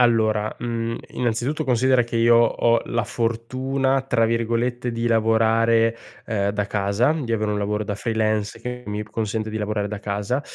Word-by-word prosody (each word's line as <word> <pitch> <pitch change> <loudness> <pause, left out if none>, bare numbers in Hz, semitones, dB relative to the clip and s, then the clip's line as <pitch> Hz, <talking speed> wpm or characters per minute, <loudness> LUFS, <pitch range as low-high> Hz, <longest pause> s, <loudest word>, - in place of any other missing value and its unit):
Allora, 110 -3 +2
mhmm, 115 -1 -2 0.2
innanzitutto, 120 +4 -1
considera 130 0 +3
che 115 - -9
io 115 0 +5
ho 115 0 +3
la 115 - -1
fortuna, 130 +4 -1
tra 115 -4 +2
virgolette 115 +2 -1
di 115 +1 -1
"lavorare", 115 0 +3 0.3
ehm, 100 -3 0
"da 105 0 -1
casa", 105 +7 +1
di 135 -8 -3
avere 110 -1 0
un 105 - -1
lavoro 105 +1 -1
da 100 -1 -4
freelance, 110 -1 -1
che 125 +1 -6
mi 105 0 -3
consente 110 0 -3
di 110 - -4
lavorare 105 -1 -2
da 105 0 -5
casa, 105 +5 -2
115 Hz, 165 wpm, -23 LUFS, 105-120 Hz, 0.3 s, io